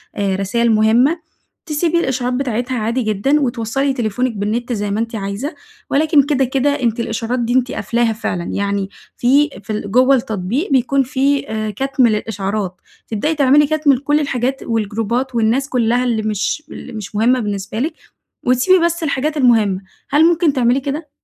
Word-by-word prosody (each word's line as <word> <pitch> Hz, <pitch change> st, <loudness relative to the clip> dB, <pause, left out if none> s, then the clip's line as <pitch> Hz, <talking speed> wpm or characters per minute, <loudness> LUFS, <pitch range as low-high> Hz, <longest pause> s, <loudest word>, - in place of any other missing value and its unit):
آآ 195 Hz, -2 st, 0 dB
رسايل 230 Hz, +4 st, +1 dB
مهمة، 245 Hz, +10 st, +2 dB, 0.4 s
تسيبي 330 Hz, +2 st, 0 dB
الإشعارات 255 Hz, -4 st, -1 dB
بتاعتها 250 Hz, -1 st, -2 dB
عادي 230 Hz, +3 st, -1 dB
جدًا 220 Hz, +7 st, +1 dB
وتوصَّلي 255 Hz, +2 st, -1 dB
تليفونِك 245 Hz, +1 st, -1 dB
بالنت 235 Hz, +4 st, -2 dB
زي 205 Hz, -1 st, -2 dB
ما 210 Hz, -, -1 dB
أنتِ 230 Hz, 0 st, -3 dB
عايزة، 205 Hz, -, -4 dB, 0.3 s
ولكن 295 Hz, 0 st, +4 dB
كده، 275 Hz, -2 st, +1 dB
كده 265 Hz, +2 st, +1 dB
أنتِ 235 Hz, 0 st, 0 dB
الإشعارات 230 Hz, +2 st, -2 dB
دي 240 Hz, 0 st, -1 dB
أنتِ 255 Hz, -1 st, +2 dB
قافلاها 235 Hz, -1 st, 0 dB
فعلًا، 180 Hz, -5 st, -3 dB
يعني 200 Hz, 0 st, -2 dB, 0.3 s
في 280 Hz, +5 st, +3 dB
في 215 Hz, -, -4 dB
ال 205 Hz, -1 st, -4 dB
جوّه 255 Hz, +4 st, +5 dB
التطبيق 230 Hz, -, -2 dB
بيكون 270 Hz, +1 st, +2 dB
في 275 Hz, +1 st, 0 dB
آآ 215 Hz, -1 st, -2 dB
كتم 265 Hz, +3 st, +1 dB
للإشعارات. 205 Hz, -3 st, -2 dB, 0.3 s
تبدئي 295 Hz, +9 st, -1 dB
تعملي 285 Hz, +1 st, +4 dB
كتم 305 Hz, -2 st, +3 dB
لكل 290 Hz, +3 st, +1 dB
الحاجات 270 Hz, -2 st, -1 dB
والجروبات 230 Hz, +3 st, -2 dB
والناس 235 Hz, +5 st, +1 dB
كلها 245 Hz, -1 st, +1 dB
اللي 235 Hz, -3 st, 0 dB
مش 215 Hz, +8 st, -1 dB
اللي -, -, -9 dB
مش 205 Hz, -3 st, -7 dB
مهمة 240 Hz, +4 st, +3 dB
بالنسبة 205 Hz, 0 st, -4 dB
لِك 310 Hz, +5 st, -1 dB, 0.5 s
وتسيبي 335 Hz, +9 st, +4 dB
بس 340 Hz, 0 st, -1 dB
الحاجات 300 Hz, +1 st, -1 dB
المهمة. 220 Hz, -7 st, +3 dB, 0.3 s
هل 295 Hz, +3 st, +4 dB
ممكن 335 Hz, -3 st, +3 dB
تعملي 250 Hz, 0 st, +2 dB
كده؟ 285 Hz, +3 st, -5 dB
245 Hz, 165 wpm, -18 LUFS, 220-275 Hz, 0.5 s, جوّه